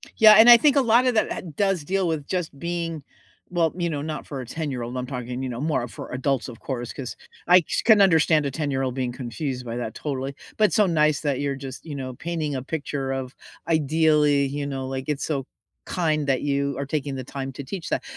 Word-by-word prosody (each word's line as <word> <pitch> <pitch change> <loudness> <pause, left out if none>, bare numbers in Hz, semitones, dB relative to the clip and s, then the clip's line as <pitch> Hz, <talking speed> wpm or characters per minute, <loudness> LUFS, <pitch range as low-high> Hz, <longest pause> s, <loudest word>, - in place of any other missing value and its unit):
Yeah, 215 -1 +8
and 225 +2 +9
I 240 - +11
think 285 +4 +4
a 280 - +5
lotta 250 +1 +4
that 215 - +1
ha - - -3
does 195 -4 +1
deal 190 +4 0
with 155 -4 -2
just 175 -6 -3
being, 165 -1 -3 0.5
well, 170 -3 +1
you 175 -1 0
know, 145 -3 -3
not 155 0 -5
for 140 - -6
a - - -7
ten-year-old. 130 -3 -4
I'm 125 - -2
talking, 125 -1 -5
you 130 - -3
know, 120 +1 -5
more 145 -5 0
for - - -9
adults, 130 0 -1
of 115 - -10
course, 120 -3 -4
'cause 125 -6 -6 0.3
I 180 +1 +7
just - - -2
can 220 -3 +7
understand 160 -4 +4
a 140 - -1
ten-year-old 135 -3 -1
being 125 -2 -1
confused 125 +1 -5
by 115 -1 -4
that 115 -2 -4
totally, 135 -1 -4 0.2
but 215 - +5
it's - - +1
so 210 - +5
nice 155 -4 +2
that 140 -4 -1
you're 140 -1 -1
just, 135 +2 -8
you 150 - -6
know, 130 -2 -5
painting 155 -1 -3
a 130 - -2
picture 140 -2 -3
of 130 -1 -4 0.3
ideally, 150 -2 +3
you 140 +1 -3
know, 135 -2 -4
like, 130 0 -4
it's 150 -2 -1
so 140 -4 -2 0.4
kind 155 -4 0
that 135 -2 +1
you 140 0 -1
are 140 - -3
taking 140 -1 -3
the 130 - -5
time 135 +1 -6
to 140 - -7
teach 170 +5 -6
that. - - -1
145 Hz, 230 wpm, -24 LUFS, 130-165 Hz, 0.5 s, I